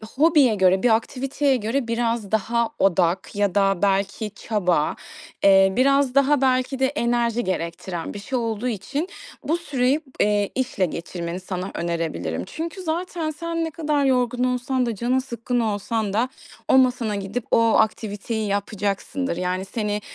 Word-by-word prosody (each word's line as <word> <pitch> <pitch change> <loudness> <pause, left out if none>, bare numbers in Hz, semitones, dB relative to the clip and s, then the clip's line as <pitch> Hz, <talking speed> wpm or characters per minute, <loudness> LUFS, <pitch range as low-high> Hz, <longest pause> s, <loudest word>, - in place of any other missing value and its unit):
hobiye 290 -5 +5
göre, 190 -1 +3
bir 235 -3 +5
aktiviteye 270 +4 0
göre 235 +3 -1
biraz 230 -3 -1
daha 230 +2 +1
odak 185 0 +1
ya 205 -2 +1
da 195 -2 +2
belki 200 +2 0
çaba, 180 -8 0 0.5
eee, 195 -1 +6
biraz 275 0 +3
daha 275 0 +4
belki 260 0 +1
de 265 - +3
enerji 240 -3 0
gerektiren 170 -1 -4
bir 205 - -6
şey 255 +6 -3
olduğu 230 0 -2
için 250 - -3 0.4
bu 325 +3 0
süreyi, 280 -3 0 0.2
eee, 205 -1 +2
işle 255 -7 0
geçirmeni 170 +1 -5
sana 185 0 -5
önerebilirim. 165 - -3
Çünkü 335 - -6
zaten 335 -1 -2
sen 330 +2 -3
ne 325 - -4
kadar 300 -3 0
yorgun 250 -2 +1
olsan 250 0 0
da 235 -2 -2
canın 245 +5 +1
sıkkın 245 -1 -3
olsan 215 -1 -1
da 235 +5 +1 0.4
o - - +5
masana 250 -4 +2
gidip 200 +4 -4
o - - +5 0.2
aktiviteyi 215 0 -1
yapacaksındır. 205 +4 -2
Yani, 185 +1 -2
seni 210 0 -2
230 Hz, 150 wpm, -23 LUFS, 195-260 Hz, 0.5 s, eee